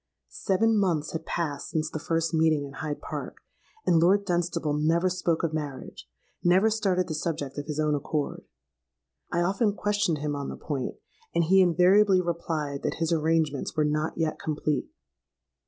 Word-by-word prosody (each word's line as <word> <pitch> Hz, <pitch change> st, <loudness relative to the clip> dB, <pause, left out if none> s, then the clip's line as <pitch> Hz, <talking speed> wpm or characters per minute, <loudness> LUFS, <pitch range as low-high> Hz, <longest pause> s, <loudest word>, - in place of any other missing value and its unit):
"Seven 220 Hz, +3 st, +1 dB
months 165 Hz, -6 st, 0 dB
had 160 Hz, 0 st, -5 dB
passed 150 Hz, -5 st, -3 dB
since 155 Hz, -1 st, -2 dB
the 155 Hz, -, -4 dB
first 165 Hz, +1 st, -1 dB
meeting 160 Hz, -2 st, +2 dB
in 140 Hz, -, -10 dB
Hyde 145 Hz, +1 st, -4 dB
Park; -, -, -6 dB, 0.5 s
and 170 Hz, -, +4 dB
Lord 195 Hz, +4 st, +4 dB
Dunstable 170 Hz, -4 st, 0 dB
never 165 Hz, +5 st, +2 dB
spoke 175 Hz, -2 st, 0 dB
of 165 Hz, -2 st, 0 dB
marriage—never 175 Hz, +6 st, -1 dB
started 190 Hz, -4 st, +1 dB
the 160 Hz, -, -3 dB
subject 150 Hz, -3 st, -3 dB
of 145 Hz, -, -6 dB
his 150 Hz, -1 st, -3 dB
own 155 Hz, -1 st, +2 dB
accord. 145 Hz, 0 st, -2 dB, 0.9 s
I 175 Hz, -, +1 dB
often 200 Hz, +4 st, +1 dB
questioned 205 Hz, -6 st, 0 dB
him 145 Hz, 0 st, -2 dB
on 140 Hz, -1 st, -4 dB
the -, -, -6 dB
point; 140 Hz, -4 st, -4 dB, 0.4 s
and 170 Hz, -, +3 dB
he 190 Hz, +4 st, +5 dB
invariably 185 Hz, +3 st, +5 dB
replied 160 Hz, -5 st, -2 dB
that -, -, -2 dB
his 165 Hz, 0 st, 0 dB
arrangements 155 Hz, -3 st, 0 dB
were 155 Hz, -, +3 dB
not 150 Hz, +1 st, -1 dB
yet 160 Hz, -2 st, -1 dB
complete. 150 Hz, -2 st, -2 dB
165 Hz, 165 wpm, -27 LUFS, 150-180 Hz, 0.9 s, he